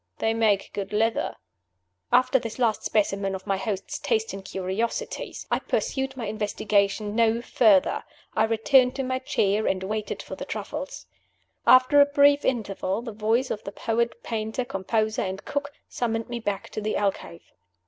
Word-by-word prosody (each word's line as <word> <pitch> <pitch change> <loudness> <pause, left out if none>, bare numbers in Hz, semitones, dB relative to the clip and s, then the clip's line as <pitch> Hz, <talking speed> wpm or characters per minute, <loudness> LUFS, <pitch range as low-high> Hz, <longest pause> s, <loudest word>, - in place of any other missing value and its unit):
They 225 - +1
make 215 -3 +1
good 200 0 -4
leather." 225 +2 +1 0.8
After 255 +2 +4
this 230 -2 -6
last 235 -4 +1
specimen 195 -2 0
of 190 - -8
my 195 -2 0
host's 195 0 -4
taste 445 -1 0
in 195 - -6
curiosities, 195 +4 -3
I - - +2
pursued 265 -1 -2
my 240 - -3
investigation 210 0 0
no 230 0 +3
further. 220 -5 +3 0.3
I 220 - +4
returned 250 +3 +4
to 270 - -2
my 255 0 -1
chair, 210 -4 +1
and 190 0 0
waited 215 +2 -3
for - - -7
the - - -6
truffles. - - -6 0.6
After 255 +3 +7
a 285 - +6
brief 285 0 +4
interval, 205 -3 -1
the 235 - -5
voice 220 +5 0
of 210 - -4
the 200 - -6
poet 235 +2 -1
painter 220 +2 -2
composer 215 +1 -1
and 190 +1 -4
cook 285 0 -3 0.2
summoned 225 -1 -2
me 240 0 -3
back 205 -3 -3
to 215 - -4
the 215 +1 -1
alcove. 195 - -2
220 Hz, 165 wpm, -26 LUFS, 200-245 Hz, 0.8 s, After